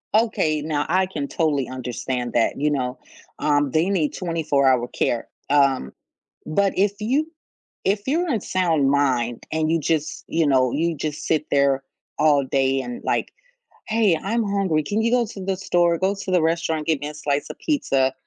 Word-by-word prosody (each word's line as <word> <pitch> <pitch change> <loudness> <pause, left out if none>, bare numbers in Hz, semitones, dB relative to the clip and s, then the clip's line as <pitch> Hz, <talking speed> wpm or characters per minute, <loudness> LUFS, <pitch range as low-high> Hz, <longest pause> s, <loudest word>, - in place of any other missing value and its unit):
Okay, 165 -9 +2
now, 150 -1 -1
I 185 +3 +2
can 150 -7 -4
totally 145 -5 0
understand 125 0 -4
that, 115 - +1
you 150 +1 +1
know, 125 -2 -2 0.4
um, 145 -2 +2
they 160 +6 +2
need 170 -7 0
twenty-four-hour 140 -8 +1
care. 120 - -1 0.2
Um, 140 - +2 0.5
but 195 +5 +1
if 200 +1 +3
you 270 +9 0 0.6
if 200 +2 +1
you're 340 +6 +1
in 230 -8 0
sound 165 -7 +1
mind 130 -4 +1
and 155 0 0
you 165 - +2
just 155 0 -1
you 165 -1 +1
know, 130 -3 +3
you 165 +4 0
just 150 0 -4
sit 155 -2 +1
there 140 -1 +2 0.3
all 145 -2 +4
day 135 0 +1
and, 245 - -7
like, - - -1 0.6
"Hey, 215 -6 +3
I'm 225 +3 0
hungry. 195 -6 0
Can 205 +9 -1
you 230 +1 +1
go 245 -1 +3
to 200 -3 -8
the 195 0 0
store, 175 -3 +2
go 190 +3 0
to 190 - -4
the 180 -3 +3
restaurant, 160 -1 0
get 160 -3 +2
me 145 - -3
a - - -9
slice 145 -1 -2
of - - -8
pizza, 135 - +1
155 Hz, 180 wpm, -23 LUFS, 140-190 Hz, 0.6 s, all